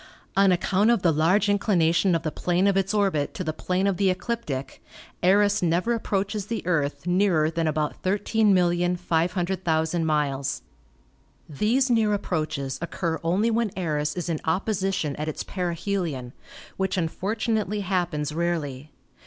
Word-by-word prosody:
On 195 -1 +5
account 195 +4 +2
of 235 -5 +2
the 170 - +4
large 165 +7 +3
inclination 185 -3 +2
of 165 - -1
the 155 - -2
plane 180 +4 0
of 200 -1 +3
its 195 0 +1
orbit 195 -9 0
to 185 - -3
the 155 -2 -2
plane 185 +4 -1
of 195 -3 +1
the 195 -1 +3
ecliptic 185 - -3 0.4
Eros 205 +3 +4
never 175 +7 +1
approaches 205 -2 -2
the 230 -4 -4
Earth 150 -4 -1
nearer 175 -4 +2
than 165 -1 -1
about 155 -1 -2
13,500,000 180 -4 +1
miles. 145 -3 -1 0.8
These 230 - +1
near 220 -3 +3
approaches 155 -8 -3
occur 170 -1 -2
only 195 +8 +1
when 230 -1 +1
Eros 150 -4 -1
is 180 -1 -4
in 165 -3 -1
op 165 +4 0
position 195 -8 -1
at 150 - -3
its 155 - -4
perihelion, 170 -7 -3 0.4
which 190 0 -1
unfortunately 210 +4 -1
happens 175 -6 -1
rarely. 155 -5 -2
180 Hz, 145 wpm, -25 LUFS, 160-200 Hz, 0.8 s, On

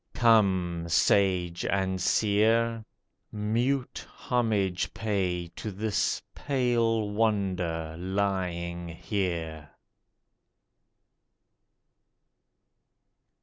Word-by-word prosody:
Come, 95 -8 +3
Sage 90 0 +2
and 95 -1 0
Seer! 110 +4 +2 0.5
mute 120 +5 -1
homage 105 -7 0
pay 95 -6 -1
To 110 - -7
this 105 +2 -1
Pale 115 -5 0
Wonder 95 -7 -1
lying 90 -2 -2
here 85 -4 -3
100 Hz, 60 wpm, -28 LUFS, 90-110 Hz, 0.5 s, Come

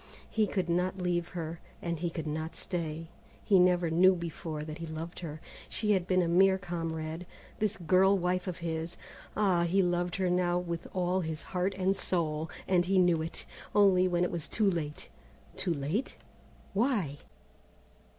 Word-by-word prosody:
He 215 -2 +2
could 190 -4 -1
not 180 +2 0
leave 175 -2 0
her, 165 0 -4 0.2
and 170 -2 -3
he 175 +1 -1
could 165 -2 -5
not 155 +1 -3
stay. 165 -2 -4 0.3
He 195 -3 +5
never 180 -2 +4
knew 185 +3 +6
before 165 -2 -5
that 155 +1 -7
he 165 - -5
loved 160 +2 -6
her. 155 -3 -6 0.3
She 210 -1 0
had 185 -3 +2
been 185 -1 +3
a - - 0
mere 190 +3 +5
comrade, 165 -2 -4 0.3
this 215 0 0
girl 190 +3 +4
wife 180 +1 0
of 180 - -3
his. 165 +1 -3 0.4
Ah! 190 -5 +3
he 185 +3 +3
loved 175 0 0
her 190 -2 0
now 175 -1 +2
with 170 -1 -3
all 185 0 +1
his 160 -2 -4
heart 185 +1 -1
and 190 +1 +2
soul, 160 -4 -1 0.2
and 180 -2 +3
he 190 +2 +2
knew 175 -3 +4
it, 160 +1 -5 0.3
only 190 -3 +5
when 175 -1 +1
it 180 - 0
was 170 -3 -2
too 210 -3 +2
late. 150 -4 -4 0.5
Too 180 - -1
late? 155 - -2 0.6
Why? 200 - +1
175 Hz, 175 wpm, -31 LUFS, 165-185 Hz, 0.6 s, knew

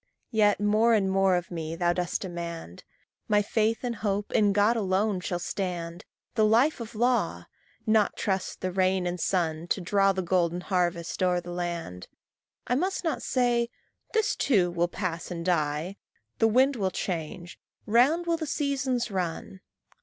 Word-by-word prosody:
Yet 210 -3 +3
more 215 +3 +3
and 195 -3 +1
more 195 -1 +3
of 175 0 -3
me 165 -1 -4
thou 175 0 +1
dost 180 -1 -2
demand; 170 - -6 0.4
My 210 -1 +3
faith 220 +3 0
and 240 -2 -2
hope 205 -1 -2
in 205 -1 +4
God 205 +4 +3
alone 200 -1 +1
shall 180 0 -3
stand, 175 -2 -4 0.3
The 220 - +2
life 235 +8 +3
of 230 -1 -8
law 245 +3 +1 0.4
not 215 -2 +2
trust 190 -3 -2
the 185 - -1
rain 185 0 +1
and 175 0 -2
sun 165 -2 -1
To 195 - 0
draw 195 +2 +3
the 190 -1 -2
golden 175 -1 +1
harvest 175 -2 -1
o'er 180 -1 +3
the 175 0 -8
land. 170 - -4 0.6
I - - 0
must 370 +10 0
not 325 - -1
say 240 -2 +1 0.4
"This 440 -2 +1
too 190 -10 +2
will 175 0 +1
pass 175 -2 -4
and 170 -2 -5
die," 160 +2 0 0.4
"The 225 - +5
wind 260 +4 +3
will 195 -3 0
change," 175 -1 -5 0.3
"Round 265 +10 +3
will 335 -1 +1
the 315 -2 -4
seasons 265 -5 -1
run." 185 0 -4
190 Hz, 165 wpm, -27 LUFS, 175-225 Hz, 0.6 s, The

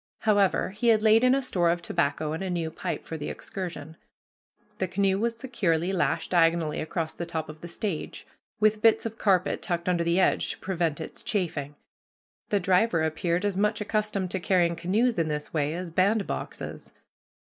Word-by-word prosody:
However, 205 -3 +2
he 215 +4 -2
had 220 -2 +5
laid 220 +2 +5
in 255 +1 +5
a 275 - 0
store 175 -9 +1
of 170 +1 +1
tobacco 155 -2 -1
and 160 - -4
a 190 - -3
new 170 -3 -2
pipe - - -4
for 160 - -5
the 150 - -5
excursion. 165 -4 -7 0.8
The 190 - 0
canoe 195 +1 +1
was 230 +1 -1
securely 190 -9 0
lashed 185 -3 0
diagonally 165 -2 +2
across 160 0 -3
the 170 - -5
top 160 -2 -4
of 155 +1 -10
the 175 - -7
stage, 175 -1 -4 0.3
with 215 0 +3
bits 225 0 +4
of 225 0 -5
carpet 190 -3 +2
tucked 170 -2 -2
under 175 -2 +2
the 170 +2 +2
edge 185 - +2
to - - -14
prevent 170 -5 -1
its - - -7
chafing. 155 -8 -2 0.7
The 205 - +2
driver 185 -1 +2
appeared 170 +4 0
as 200 -2 0
much 210 +1 +1
accustomed 210 -3 -1
to 190 - -1
carrying 175 -2 +2
canoes 200 +6 +1
in 165 - +1
this 150 -1 -4
way 150 0 0
as 180 -1 -5
bandboxes. 195 +5 -1
180 Hz, 185 wpm, -27 LUFS, 165-205 Hz, 0.8 s, had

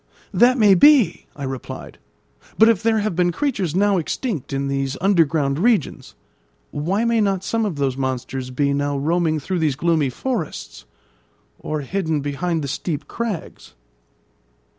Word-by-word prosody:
"That 250 +2 +4
may 210 -4 +6
be," 235 - +5
I 140 - -7
replied; 130 -1 -7 0.6
"but 220 - +7
if 230 -5 +3
there 225 -1 +2
have 205 -4 -2
been 175 0 +2
creatures 195 - -2
now 200 0 +3
extinct 170 - -4
in 140 0 -2
these 135 0 -2
underground 160 -7 +2
regions, 215 - 0 0.6
why 190 +10 -1
may 230 -1 +2
not 195 -2 0
some 225 +2 -1
of 185 - -4
those 135 -2 -1
monsters 130 -1 -3
be 140 +2 0
now 145 0 -1
roaming 160 +2 0
through 180 +5 -3
these 155 -4 +1
gloomy 160 -2 +1
forests, 220 - -5 0.7
or 155 -1 -3
hidden 160 0 -2
behind 155 +3 -2
the - - -3
steep 150 +2 -4
crags?" 230 -7 -6
165 Hz, 150 wpm, -21 LUFS, 140-205 Hz, 0.7 s, but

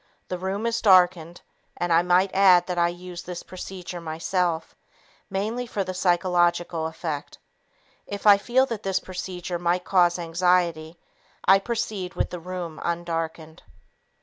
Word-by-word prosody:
The 180 - -2
room 195 +4 -3
is 230 0 0
darkened 180 -4 +4 0.4
(and 175 -1 0
I 165 - +5
might 180 +2 +2
add 185 -2 +6
that 180 -1 -2
I 170 - +4
use 175 0 -7
this 180 -1 -7
procedure 180 -1 -8
myself) 165 +1 -2 0.5
mainly 220 +5 -2
for 205 -3 -2
the 185 0 -5
psychological 175 -2 +1
effect. 160 -2 -5 0.7
If 200 0 -6
I 205 -1 +8
feel 250 +5 +2
that 230 -5 -5
this 190 -2 0
procedure 180 -1 -5
might 175 +1 0
cause 175 -2 +3
anxiety, 170 -1 0 0.5
I 195 +1 +6
proceed 200 -4 -3
with - - -1
the 180 - -5
room 175 -2 -6
undarkened. 165 -2 -4
180 Hz, 145 wpm, -25 LUFS, 170-190 Hz, 0.7 s, I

